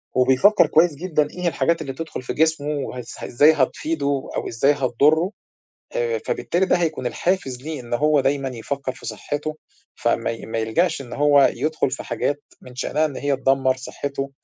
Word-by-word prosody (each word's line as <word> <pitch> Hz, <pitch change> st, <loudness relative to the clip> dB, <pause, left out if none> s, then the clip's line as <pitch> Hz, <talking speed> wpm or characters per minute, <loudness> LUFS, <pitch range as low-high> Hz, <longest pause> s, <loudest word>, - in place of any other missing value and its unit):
وبيفكّر 130 Hz, +12 st, +5 dB
كويس 160 Hz, 0 st, +3 dB
جدًا 155 Hz, -2 st, 0 dB
إيه 180 Hz, -, -11 dB
هي 180 Hz, -, +1 dB
الحاجات 170 Hz, 0 st, +1 dB
اللي 140 Hz, -4 st, -4 dB
تدخُل 160 Hz, +1 st, -6 dB
في 125 Hz, -, -4 dB
جسمه 160 Hz, -2 st, +1 dB
وهز 130 Hz, -5 st, -4 dB
إزاي 145 Hz, +6 st, +5 dB
هتفيده 140 Hz, 0 st, -1 dB
أو -, -, -2 dB
إزاي 120 Hz, +5 st, +2 dB
هتضرّه، 145 Hz, -, +2 dB, 0.6 s
آآ 475 Hz, -1 st, 0 dB
فبالتالي 190 Hz, -, 0 dB
ده -, -, +3 dB
هيكون 160 Hz, -7 st, -1 dB
الحافز 135 Hz, -4 st, -1 dB
ليه 155 Hz, 0 st, -5 dB
إن 120 Hz, -1 st, -5 dB
هو 150 Hz, +3 st, +3 dB
دايمًا 135 Hz, 0 st, 0 dB
يفكّر 130 Hz, +2 st, -4 dB
في 130 Hz, -, -12 dB
صحّته، 150 Hz, +1 st, -4 dB, 0.4 s
فما -, -, 0 dB
ي 115 Hz, -, -7 dB
ما 115 Hz, -, -3 dB
يلجأش 155 Hz, +11 st, +1 dB
إن 125 Hz, -3 st, -9 dB
هو 145 Hz, -1 st, +5 dB
يدخُل 155 Hz, -3 st, -1 dB
في 130 Hz, -, -4 dB
حاجات 145 Hz, 0 st, -2 dB, 0.2 s
من 125 Hz, -, -13 dB
شأنها 150 Hz, +5 st, 0 dB
إن 145 Hz, -4 st, -7 dB
هي 145 Hz, 0 st, 0 dB
تدمّر 135 Hz, -1 st, +2 dB
صحّته 140 Hz, +1 st, -5 dB
145 Hz, 180 wpm, -22 LUFS, 130-160 Hz, 0.6 s, وبيفكّر